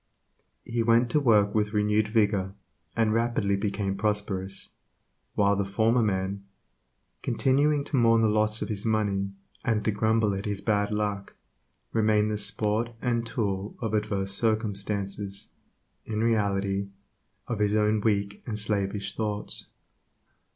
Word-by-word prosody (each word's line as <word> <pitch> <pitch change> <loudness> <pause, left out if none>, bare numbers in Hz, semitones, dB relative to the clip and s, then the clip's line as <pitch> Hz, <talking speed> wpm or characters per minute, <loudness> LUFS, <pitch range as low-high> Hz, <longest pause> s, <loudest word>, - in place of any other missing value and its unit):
He 120 0 -1
went 115 +1 +3
to 150 - +3
work 105 -7 +4
with 105 -1 0
renewed 105 0 +2
vigor, 100 -3 +1 0.4
and 110 -2 +2
rapidly 115 -3 +1
became 100 -1 -1
prosperous, 100 -2 -2 0.7
while 100 0 +3
the 100 - 0
former 110 +5 +2
man, 100 -1 -1 0.8
continuing 145 +2 +2
to 145 - -3
mourn 115 -1 +4
the - - +5
loss 105 +1 +2
of - - -5
his 105 -2 -3
money, 100 -3 0 0.3
and 110 -2 0
to 110 - +3
grumble 110 0 +2
at 95 +2 -4
his 105 -2 -2
''bad 105 0 +1
luck," 105 -2 -2 0.6
remained 110 -1 +3
the 105 - -1
sport 110 +2 0
and 120 -2 0
tool 105 -3 -2
of 110 -3 -3
adverse 100 -2 0
circumstances, 100 -2 -2 0.5
in 110 0 -2
reality 100 -3 +1 0.6
of 115 -3 -3
his 105 0 +2
own 105 0 +2
weak 100 -2 0
and 110 -3 -3
slavish 100 -1 -1
thoughts. 105 -2 -3
105 Hz, 135 wpm, -27 LUFS, 100-110 Hz, 0.8 s, the